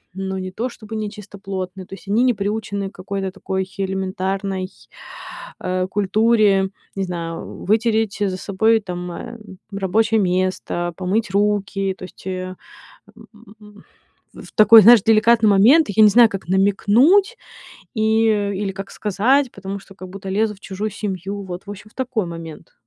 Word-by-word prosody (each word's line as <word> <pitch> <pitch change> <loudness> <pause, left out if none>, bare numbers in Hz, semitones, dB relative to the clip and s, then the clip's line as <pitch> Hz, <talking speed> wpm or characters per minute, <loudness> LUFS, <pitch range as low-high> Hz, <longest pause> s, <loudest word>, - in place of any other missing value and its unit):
ну, 190 0 -4
не 185 0 -5
то 235 +6 -3
чтобы 220 -2 -10
нечистоплотны, 195 -3 -6
то 195 - -13
есть 195 - -11
они 220 +5 +2
не 250 -1 +3
приучены 200 -1 -3
к - - -23
какой-то 195 +1 -4
такой 190 -1 -4
элементарной, 190 0 -3 0.9
э, 185 0 -1
культуре: 205 -1 +2 0.3
не 195 - -2
знаю, 170 -2 -6
вытереть 220 0 +1
за 190 -2 0
собой 220 +4 +2
там, 180 -2 -6
э, 230 +7 -8 0.3
рабочее 215 +3 +1
место, 180 -2 -1
помыть 195 +4 -1
руки, 200 -1 0
то - - -13
есть, 180 - -16
э, 185 0 -4 0.6
м, 210 -2 -17 0.5
в - - -12
такой, 215 +1 +8
знаешь, 235 -1 +8
деликатный 225 0 +4
момент. 245 +11 +5
Я 215 +2 +4
не 210 - +8
знаю, 230 +1 +6
как 195 -4 -7
намекнуть 225 - +3 0.6
и 220 0 +2 0.3
или 195 0 -3
как 195 0 -8
сказать, 240 +6 +1
потому 195 0 -6
что 195 - -16
как 185 -1 -10
будто 195 0 -7
лезу 210 +2 0
в - - -24
чужую 205 +2 -4
семью. 200 0 -5
Вот, 180 -1 -7
в 205 - -7
общем, 205 +1 -10
в - - -29
такой 250 -7 -2
момент. 165 -2 -9
200 Hz, 155 wpm, -20 LUFS, 190-220 Hz, 0.9 s, такой